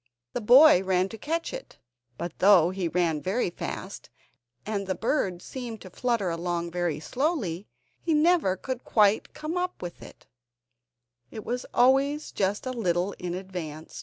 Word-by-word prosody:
The 245 - -2
boy 250 - +8
ran 185 0 +1
to 225 - -8
catch 330 - -2
it, - - -8 0.4
but 175 -1 -6
though 185 -3 +6
he 185 -2 -2
ran 165 -3 0
very 190 0 -1
fast, - - -6 0.6
and 205 -2 -3
the 190 - -1
bird 185 - -1
seemed 240 -4 -6
to 185 - -11
flutter 230 -5 0
along 170 0 -2
very 175 -3 -1
slowly, 210 - -2 0.3
he 325 -2 +1
never 305 - +3
could 255 +4 -5
quite 210 -1 +2
come 310 +3 -4
up 360 0 -2
with 175 -1 -7
it; - - -13 1.0
it 215 - -8
was 245 +1 -3
always 275 +4 +3
just 200 +3 -1
a 255 - -2
little 185 -4 0
in 180 -1 -3
advance. 175 -5 -7
200 Hz, 160 wpm, -27 LUFS, 175-255 Hz, 1.0 s, boy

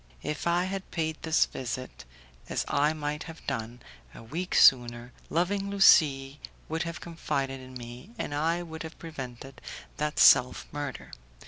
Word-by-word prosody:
If 150 +2 -3
I 175 +1 +3
had 190 +1 -4
paid 160 -2 -2
this 160 -1 +3
visit, 130 - -6 0.4
as - - -1
I 145 +2 +2
might 150 0 -4
have 165 -1 -11
done, 115 +2 -4 0.3
a - - -11
week 170 +11 -4
sooner, 120 -1 +5 0.2
loving 195 +4 0
Lucie 145 -8 +5 0.3
would 160 +1 -2
have 170 -1 -4
confided 135 -5 -3
in 130 0 -12
me, 120 - -9
and 145 - -4
I 165 +4 0
would 160 -1 -8
have 160 0 -8
prevented 135 -5 -8 0.4
that 150 0 -2
self 125 0 +6
murder. 145 -1 -6
150 Hz, 150 wpm, -28 LUFS, 130-165 Hz, 0.4 s, self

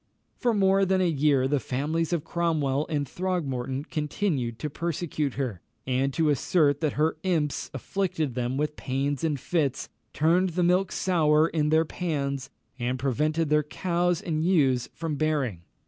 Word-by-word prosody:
For 240 -2 +1
more 195 -1 +4
than 190 0 +2
a 185 - +3
year 140 -4 +2
the 145 +1 +1
families 150 +7 -1
of 170 -4 0
Cromwell 155 -5 0
and 145 -3 -1
Throgmorton 140 -7 -2
continued 150 - -2
to 150 - -3
persecute 155 -3 -2
her, 125 -10 -3 0.2
and 130 +1 +1
to 160 -2 +3
assert 145 0 +2
that 155 -3 +1
her 155 +2 +1
imps 160 -6 -1
afflicted 160 -1 -2
them 125 +1 -2
with 150 +1 -1
pains 140 +2 -2
and 150 -4 0
fits, 145 -3 -1 0.2
turned 175 +4 +2
the 180 +1 +1
milk 180 +1 +2
sour 160 -3 +3
in 150 -2 0
their 160 +1 +4
pans, 140 -6 -3 0.3
and 125 +1 -1
prevented 150 +5 0
their 150 0 +4
cows 175 +2 -1
and 155 -2 -1
ewes 135 -9 +2
from 160 -3 -4
bearing. 140 - 0
150 Hz, 160 wpm, -27 LUFS, 135-170 Hz, 0.3 s, more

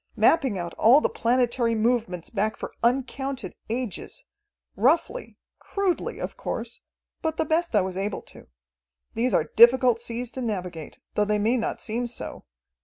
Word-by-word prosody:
Mapping 265 -10 +3
out 175 -1 -4
all 245 +6 +7
the - - +1
planetary 235 -1 +1
movements 220 -6 0
back 215 0 -1
for - - -6
uncounted 260 -2 -1 0.2
ages 245 - -4 0.5
roughly, 320 - +1 0.2
crudely, 395 -3 -1
of - - -5
course, - - -5 0.4
but 320 -1 -2
the - - +1
best 325 -2 +1
I 205 - +6
was 185 0 -3
able 195 +1 -3
to. - - -15 0.7
These 245 +3 +1
are - - 0
difficult 240 0 +7
seas 235 +1 -4
to 260 - -5
navigate, 180 -8 -4 0.2
though 210 - +2
they 210 0 +1
may 220 +4 +2
not 230 - -2
seem 240 +2 -2
so. 240 - -7
235 Hz, 155 wpm, -25 LUFS, 210-260 Hz, 0.7 s, all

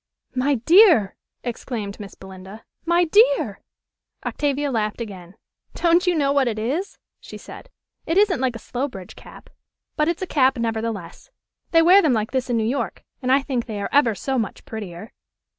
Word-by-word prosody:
"My 265 +2 +1
dear!" 320 - +5 0.3
exclaimed 225 -4 -5
Miss 200 -2 -9
Belinda. 190 +3 -12 0.2
"My 345 +1 +3
dear!" 455 +9 +3 0.6
Octavia 290 0 -1
laughed 215 -3 -1
again. 190 -5 -8 0.4
"Don't 345 +1 +3
you 355 - +3
know 280 -3 +2
what 275 -2 +2
it 220 -2 -2
is?" 280 - -3 0.2
she - - -10
said. - - -12 0.4
"It 330 - 0
isn't 400 -6 +3
like 255 -2 0
a 230 - -10
Slowbridge 245 -8 -5
cap; - - -14 0.4
but 300 - +1
it's 340 +2 -1
a - - -1
cap, 265 -6 +2
nevertheless. 225 - -4 0.4
They 330 -1 +5
wear 370 +4 +7
them 300 -7 +2
like 220 -1 -1
this 260 -1 -2
in 240 - +1
New 220 - +1
York, 260 +5 -3 0.2
and 255 -1 0
I 270 +1 +4
think 250 -4 -3
they 215 -3 -5
are 200 - -3
ever 250 -6 +3
so 265 +4 -2
much 220 - -5
prettier." 205 -2 -8
255 Hz, 175 wpm, -22 LUFS, 220-310 Hz, 0.6 s, wear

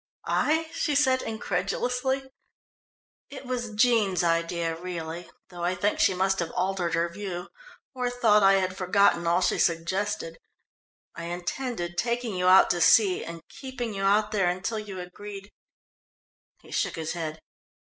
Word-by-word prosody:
"I?" 320 +1 +1
she 300 -3 -1
said 260 -2 +3
incredulously. 250 +7 -2 1.0
"It 275 -1 -9
was 240 -3 -4
Jean's 215 -6 +3
idea, 165 0 0
really, 170 -1 -6 0.2
though 175 -2 -8
I 180 +1 0
think 205 +3 0
she 185 - +4
must 190 +1 +1
have 170 -2 -1
altered 180 -2 0
her 170 +1 +1
view, 180 0 -6 0.4
or 250 -2 -1
thought 230 -4 +3
I 195 0 +6
had 185 -1 +1
forgotten 185 -2 +2
all 175 +2 +3
she - - +1
suggested. 170 0 -1 0.7
I 170 - -7
intended 175 +1 -4
taking 235 -3 -1
you 180 0 0
out 185 +1 +7
to 175 - -1
sea 195 0 +5
and 165 0 -9
keeping 250 -4 -6
you 195 - -4
out 210 +2 +2
there 195 -4 +2
until 185 +5 -2
you 200 -3 -7
agreed 200 +3 -9 0.6
" - - -45
he - - -15
shook - - -1
his 160 -1 -4
head. 160 -2 -5
190 Hz, 155 wpm, -27 LUFS, 175-225 Hz, 1.0 s, out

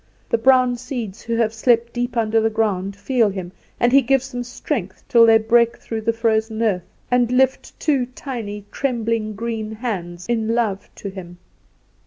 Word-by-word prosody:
The 230 - +2
brown 255 0 +4
seeds, 235 -5 -6
who 230 0 -2
have 225 -1 +1
slept 235 +1 +2
deep 245 0 -2
under 225 0 +2
the 225 - +2
ground, 200 -3 -1
feel 230 +1 +1
him, 185 -3 -6 0.3
and 240 - +3
he 275 +1 +7
gives 270 +1 +1
them 245 0 -3
strength, 240 - -4
till 230 -1 +6
they 225 0 +7
break 235 +1 +3
through 225 -1 -5
the 230 +1 +1
frozen 225 -1 0
earth, 185 -5 0 0.2
and 245 -1 +3
lift 265 +1 +1
two 275 -6 +1
tiny, 230 -6 -6
trembling 230 -5 -1
green 220 0 -4
hands 180 -7 -5
in 230 -1 0
love 215 -5 -1
to 200 - -6
him. 175 -2 -9
230 Hz, 175 wpm, -21 LUFS, 215-245 Hz, 0.3 s, he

